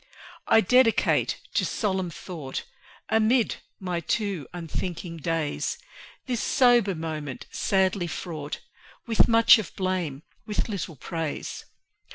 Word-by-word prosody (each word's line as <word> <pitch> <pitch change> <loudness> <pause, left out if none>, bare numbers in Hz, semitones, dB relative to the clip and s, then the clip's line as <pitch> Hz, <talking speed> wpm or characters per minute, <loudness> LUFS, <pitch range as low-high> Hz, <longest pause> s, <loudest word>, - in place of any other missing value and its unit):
I 225 - +6
dedicate 250 +3 +3
to - - +2
solemn 190 -4 -1
thought 155 -5 -6 0.5
Amid 225 +2 +3 0.2
my 180 -3 -2
too 190 - -2
unthinking 170 0 -5
days, 160 -1 -1 0.5
This 245 -4 -1
sober 240 -7 +4
moment, 155 -4 -5
sadly 190 -2 +1
fraught 155 -3 -5 0.4
With 230 -3 +4
much 230 0 +7
of 210 - -6
blame, 180 -7 -2 0.2
with 210 - -1
little 195 -6 -4
praise. 160 +3 -4
185 Hz, 110 wpm, -26 LUFS, 165-220 Hz, 0.5 s, much